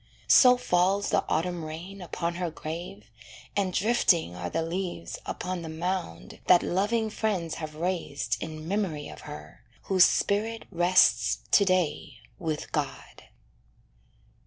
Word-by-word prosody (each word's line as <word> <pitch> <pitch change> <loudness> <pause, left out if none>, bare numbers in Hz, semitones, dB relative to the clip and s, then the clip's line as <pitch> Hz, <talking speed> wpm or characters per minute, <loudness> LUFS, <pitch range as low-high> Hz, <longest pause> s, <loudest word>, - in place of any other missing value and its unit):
So 250 -1 +7
falls 195 -2 +1
the - - +2
autumn 170 +1 -1
rain 170 +5 -8
Upon 170 -1 -3
her 175 - 0
grave, 155 - -7 0.4
and 195 -2 +1
drifting 180 - +2
are 90 0 -4
the 165 - -1
leaves 175 0 -4
Upon 180 -1 -4
the 165 - -6
mound 160 - -4
that 180 - +6
loving 215 +4 0
friends 190 -8 -1
have 155 -1 -6
raised 155 -8 -2
In 155 0 -6
memory 180 -7 -2
of - - -11
her, 75 +1 -10 0.2
whose 185 -2 +5
spirit 220 +3 0
rests 175 -10 +3
To 200 - +6
day 180 -8 0 0.2
with 155 -3 -4
God. - - -4
175 Hz, 135 wpm, -27 LUFS, 155-195 Hz, 0.4 s, So